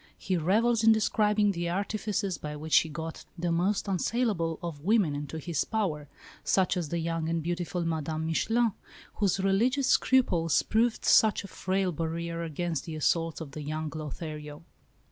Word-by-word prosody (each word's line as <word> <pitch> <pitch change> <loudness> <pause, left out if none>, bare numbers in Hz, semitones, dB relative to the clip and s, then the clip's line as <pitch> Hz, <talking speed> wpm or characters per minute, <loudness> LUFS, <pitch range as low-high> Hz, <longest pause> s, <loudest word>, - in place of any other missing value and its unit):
He 190 - -2
revels 220 +7 +2
in 225 - +7
describing 210 -1 +2
the 170 -2 -2
artifices 200 0 -2
by 150 0 -5
which 155 +1 +2
he 160 - +3
got 160 +1 -6
the 175 0 -1
most 185 +5 +1
unassailable 190 -4 0
of 165 -4 -5
women 195 -6 +3
into 145 +2 -5
his 160 -1 -1
power 170 -10 -2 0.4
such 190 0 +2
as 170 -5 -2
the 170 - -1
young 165 -1 -2
and 165 -1 -1
beautiful 175 0 -2
Madame 160 -1 -2
Michelin, 225 +8 +1 0.5
whose 200 -2 +1
religious 230 +8 +2
scruples 180 - +3
proved 230 +1 +1
such 215 -2 +5
a - - -7
frail 190 -1 -1
barrier 165 +1 -3
against 165 0 -3
the 160 - -6
assaults 165 +1 0
of 150 -4 -7
the 150 - -7
young 155 +1 -4
Lothario. 150 0 -7
170 Hz, 165 wpm, -29 LUFS, 160-205 Hz, 0.5 s, in